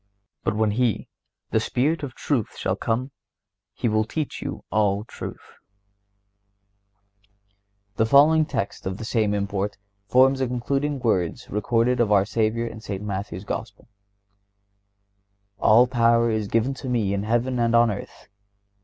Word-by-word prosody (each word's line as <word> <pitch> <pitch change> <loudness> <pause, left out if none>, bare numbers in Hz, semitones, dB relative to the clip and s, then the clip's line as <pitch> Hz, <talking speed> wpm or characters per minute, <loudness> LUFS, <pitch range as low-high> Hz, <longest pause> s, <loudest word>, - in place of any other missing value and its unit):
But - - 0
when 110 -1 +2
He, 115 0 0 0.4
the - - +3
Spirit 150 +6 0
of 135 -4 -6
truth, 130 -8 -2
shall - - -1
come, 125 +4 -2 0.6
He - - -2
will 110 -1 +2
teach 150 +7 -4
you - - -5
all 105 -1 +1
truth."(125) 100 0 -17
The 110 - +3
following 155 +5 +6
text 100 - -3
of 95 0 -3
the 110 - -6
same 110 -2 +1
import 100 0 -2 0.3
forms 130 +4 +4
the 130 - 0
concluding 135 +4 -1
words 95 -9 -1
recorded 115 +4 +1
of 115 -3 +2
our 100 -1 +5
Savior 110 +1 0
in 115 -1 -7
St. 100 -2 -5
Matthew's 100 -2 -5
Gospel: 100 0 -6 1.7
"All 115 +3 +6
power 115 -2 +3
is 110 -2 -1
given 115 +6 +1
to 130 0 -7
Me 110 -5 0
in 100 - -1
heaven 120 +4 0
and 115 0 +2
on 115 -1 +5
earth. 100 - -8
110 Hz, 145 wpm, -24 LUFS, 100-120 Hz, 1.7 s, following